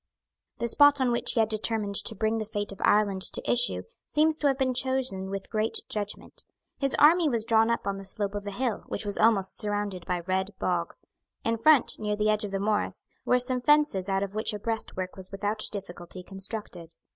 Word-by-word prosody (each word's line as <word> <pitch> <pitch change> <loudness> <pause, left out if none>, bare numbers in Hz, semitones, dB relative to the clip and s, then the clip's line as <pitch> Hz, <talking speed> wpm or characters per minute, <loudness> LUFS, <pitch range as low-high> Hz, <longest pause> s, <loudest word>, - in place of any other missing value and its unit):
The 235 - -1
spot 290 +3 +6
on 255 -2 +2
which 235 - +2
he - - 0
had 220 - +4
determined 215 -1 -2
to 220 - -1
bring 220 +1 0
the 215 - -3
fate 205 -2 -3
of 195 - -10
Ireland 205 -2 +3
to - - +1
issue 245 0 +2 0.2
seems 310 +1 +2
to 295 - +2
have 270 -1 +1
been 260 -2 +1
chosen 255 -7 -2
with 195 0 -6
great 215 +1 0
judgment. 205 -1 -6 0.4
His 275 -1 +1
army 320 +2 +5
was 230 -4 0
drawn 225 0 +3
up 235 - -1
on 200 -1 -2
the 195 - -10
slope 200 +1 -1
of 205 0 -5
a - - -3
hill, 240 +1 -2
which 205 - -4
was 205 -1 -1
almost 215 -4 +2
surrounded 205 -4 -2
by 180 -1 -1
red 190 +3 -2
bog. 175 -3 -2 0.5
In 230 - +1
front, 285 +4 +3
near 210 -1 -1
the 210 +1 +1
edge 215 0 0
of 205 - -3
the 195 0 -3
morass, 210 +1 -1 0.2
were 250 - +4
some 250 0 +1
fences 275 -9 +3
out 195 0 +1
of 200 0 -5
which 215 0 -2
a - - -6
breastwork 205 -4 -4
was 190 -1 -8
without 205 +2 -2
difficulty 185 -2 -7
constructed. 190 -3 -4
210 Hz, 215 wpm, -27 LUFS, 195-235 Hz, 0.5 s, spot